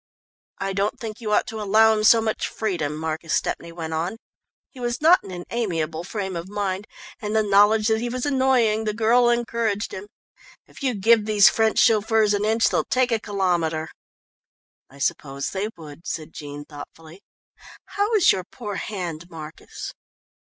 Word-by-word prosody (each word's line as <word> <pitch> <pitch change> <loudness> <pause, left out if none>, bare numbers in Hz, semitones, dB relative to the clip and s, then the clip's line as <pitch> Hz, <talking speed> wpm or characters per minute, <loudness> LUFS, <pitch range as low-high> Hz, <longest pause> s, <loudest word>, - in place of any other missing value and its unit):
"I 195 0 -3
don't 200 +2 -1
think 225 0 -7
you 215 -2 -3
ought 210 - +3
to 225 -3 -6
allow 220 +2 +5
him 215 - -1
so 225 +1 +6
much 220 -1 -1
freedom," 170 -9 -2
Marcus 160 +1 -2
Stepney 170 - -2
went 165 -1 -6
on. 170 +7 -2 0.5
He 260 - -14
was 240 -1 -2
not 340 +5 +5
in - - -10
an 175 -1 -7
amiable 165 -8 -2
frame 190 0 -4
of 170 +2 -5
mind, 200 0 -3 0.3
and 210 0 -3
the 220 - +3
knowledge 210 +2 +4
that 220 0 +1
he 240 - -2
was 255 +2 -3
annoying 260 -6 +2
the 210 -1 -1
girl 235 +2 +4
encouraged 230 -3 -1
him. 190 +2 -7 0.6
"If - - -16
you 260 -4 0
give 220 +2 +4
these 210 -2 +6
French 220 -1 +1
chauffeurs 220 -1 +4
an 205 +1 0
inch 225 +1 +3
they'll - - +1
take 255 -1 +1
a 225 - +2
kilometre." 175 -6 -1 1.0
"I 135 - -16
suppose 140 0 -2
they 200 +2 -2
would," 155 0 -11
said 155 -1 -5
Jean 145 0 -8
thoughtfully. 160 +4 -12 0.6
"How 410 +2 -1
is 390 -5 +6
your 185 - -2
poor 205 +1 -7
hand, 175 -5 -5
Marcus?" 155 -2 -9
210 Hz, 175 wpm, -23 LUFS, 170-225 Hz, 1.0 s, so